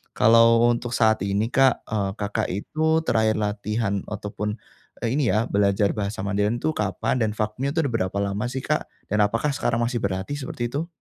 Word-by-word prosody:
kalau 115 Hz, +1 st, +6 dB
untuk 120 Hz, 0 st, -4 dB
saat 110 Hz, -1 st, +3 dB
ini 105 Hz, +4 st, 0 dB
Kak, 135 Hz, -1 st, +3 dB
e 110 Hz, -, -3 dB, 0.2 s
Kakak 100 Hz, 0 st, -1 dB
itu 160 Hz, +9 st, 0 dB
terakhir 110 Hz, -1 st, +2 dB
latihan 105 Hz, 0 st, -1 dB
atau 105 Hz, -, -5 dB
pun, 105 Hz, 0 st, -3 dB, 0.5 s
e -, -, -1 dB
ini 140 Hz, -4 st, +1 dB
ya, 110 Hz, +4 st, +2 dB
belajar 100 Hz, 0 st, +2 dB
bahasa 100 Hz, +1 st, -3 dB
Mandarin 105 Hz, +3 st, 0 dB
itu 155 Hz, -, +1 dB
kapan, 105 Hz, +4 st, -1 dB
dan 110 Hz, -1 st, +1 dB
vakumnya 110 Hz, +6 st, -1 dB
itu 165 Hz, -, +3 dB
ada 130 Hz, -, -1 dB
berapa 95 Hz, -2 st, -1 dB
lama 100 Hz, +3 st, -2 dB
sih 130 Hz, 0 st, -3 dB
Kak, -, -, 0 dB, 0.3 s
dan 105 Hz, -, +1 dB
apakah 115 Hz, +8 st, 0 dB
sekarang 115 Hz, -, 0 dB
masih 120 Hz, -1 st, -1 dB
berlatih 95 Hz, +7 st, -2 dB
seperti 120 Hz, -3 st, -4 dB
itu? 160 Hz, +4 st, -2 dB
110 Hz, 190 wpm, -24 LUFS, 105-120 Hz, 0.5 s, kalau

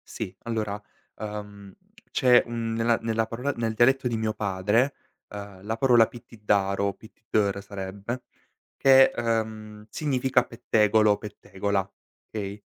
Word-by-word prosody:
Sì, 100 Hz, -5 st, -6 dB
allora, 105 Hz, -3 st, -3 dB, 0.4 s
ehm, 105 Hz, -2 st, -7 dB, 0.4 s
c'è, 125 Hz, -3 st, +5 dB
mhmm, 115 Hz, -1 st, -3 dB
nella 115 Hz, 0 st, +2 dB
nella 115 Hz, 0 st, 0 dB
parola 125 Hz, +5 st, -2 dB
nel 115 Hz, -1 st, -1 dB
dialetto 130 Hz, +3 st, +3 dB
di 115 Hz, -2 st, -1 dB
mio 110 Hz, -1 st, -1 dB
padre, 105 Hz, +7 st, +1 dB, 0.4 s
ehm, 100 Hz, -2 st, -9 dB
la 110 Hz, +2 st, -3 dB
parola 120 Hz, -2 st, +5 dB
pittiddaro, 100 Hz, -4 st, -1 dB
pittiddèro 105 Hz, -2 st, -2 dB
sarebbe, 100 Hz, +4 st, -6 dB, 0.5 s
che, 135 Hz, 0 st, +7 dB
ehm, 110 Hz, -2 st, -3 dB
significa 130 Hz, -2 st, +1 dB
pettegolo, 110 Hz, -2 st, +3 dB
pettegola, 100 Hz, -1 st, -3 dB, 0.5 s
okay? 100 Hz, -1 st, -6 dB
110 Hz, 120 wpm, -26 LUFS, 100-115 Hz, 0.5 s, che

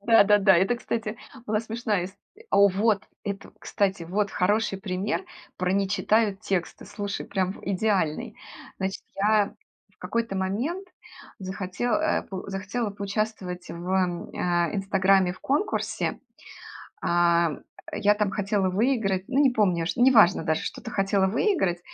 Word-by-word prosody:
Да-да-да, 205 Hz, -4 st, +6 dB
это, 195 Hz, +7 st, +2 dB
кстати, 225 Hz, -2 st, -3 dB, 0.3 s
была 215 Hz, 0 st, +1 dB
смешная 225 Hz, -4 st, -2 dB
исто 195 Hz, -, -14 dB, 0.3 s
О, 200 Hz, 0 st, +6 dB
вот, 205 Hz, +1 st, +1 dB, 0.2 s
это, 200 Hz, -1 st, -5 dB
кстати, 195 Hz, -3 st, -1 dB
вот 200 Hz, +4 st, -1 dB
хороший 205 Hz, +1 st, +1 dB
пример 195 Hz, -, -2 dB, 0.3 s
про 180 Hz, 0 st, 0 dB
не 195 Hz, 0 st, +1 dB
читают 210 Hz, 0 st, +1 dB
тексты. 190 Hz, -5 st, -3 dB
Слушай, 205 Hz, -1 st, -5 dB
прям 190 Hz, -1 st, -1 dB
в -, -, -13 dB
идеальный. 200 Hz, +1 st, 0 dB, 0.4 s
Значит, 190 Hz, 0 st, -3 dB
я 210 Hz, +1 st, +2 dB, 0.4 s
в -, -, -43 dB
какой-то 225 Hz, +2 st, -2 dB
момент 250 Hz, -, -2 dB, 0.5 s
захоте 190 Hz, +2 st, -5 dB
э, 220 Hz, -, +1 dB
по 190 Hz, 0 st, -7 dB
захотела 200 Hz, +4 st, -3 dB
поучаствовать 200 Hz, -3 st, -4 dB
в, 170 Hz, +1 st, -7 dB, 0.5 s
а, 175 Hz, -1 st, +1 dB
"Инстаграме" 195 Hz, -2 st, +3 dB
в 185 Hz, -, -15 dB
конкурсе. 290 Hz, +10 st, -1 dB, 0.8 s
А, 170 Hz, -2 st, +3 dB, 0.4 s
я 205 Hz, 0 st, +3 dB
там 210 Hz, -2 st, 0 dB
хотела 200 Hz, -2 st, 0 dB
выиграть, 200 Hz, -3 st, +1 dB
ну, 270 Hz, +2 st, +2 dB
не 270 Hz, -, +5 dB
помню, 185 Hz, -8 st, +1 dB
ш 175 Hz, -, -2 dB
не 260 Hz, +2 st, +6 dB
важно 200 Hz, -5 st, +5 dB
даже, 160 Hz, -1 st, 0 dB
что-то -, -, -6 dB
хотела 195 Hz, 0 st, +2 dB
выиграть. 195 Hz, -, +1 dB
200 Hz, 140 wpm, -26 LUFS, 185-215 Hz, 0.8 s, Да-да-да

